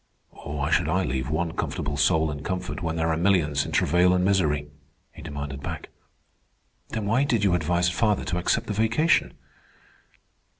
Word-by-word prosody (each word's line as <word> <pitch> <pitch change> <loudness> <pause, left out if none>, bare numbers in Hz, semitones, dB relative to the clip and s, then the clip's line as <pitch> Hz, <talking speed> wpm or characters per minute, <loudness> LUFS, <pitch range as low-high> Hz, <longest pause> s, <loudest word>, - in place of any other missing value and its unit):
"Why 70 0 -4
should 80 - +2
I 95 +3 +1
leave 65 -1 -2
one 80 +2 -1
comfortable 75 -2 -3
soul 80 +1 +2
in 70 -1 -6
comfort 90 +3 -4
when 80 -2 -2
there 80 0 0
are 80 - 0
millions 80 -5 +2
in - - -6
travail 90 +3 +3
and 90 0 +1
misery?" 75 -7 +1 0.4
he - - -13
demanded 70 -1 -6
back. - - -6 1.0
"Then 110 -2 -3
why 115 +6 +2
did 115 -7 +1
you 95 -3 +3
advise 85 +1 +1
father 105 +3 +1
to 90 -1 -1
accept 115 +6 0
the 105 - -3
vacation?" 115 +10 +2
85 Hz, 170 wpm, -25 LUFS, 75-100 Hz, 1.0 s, travail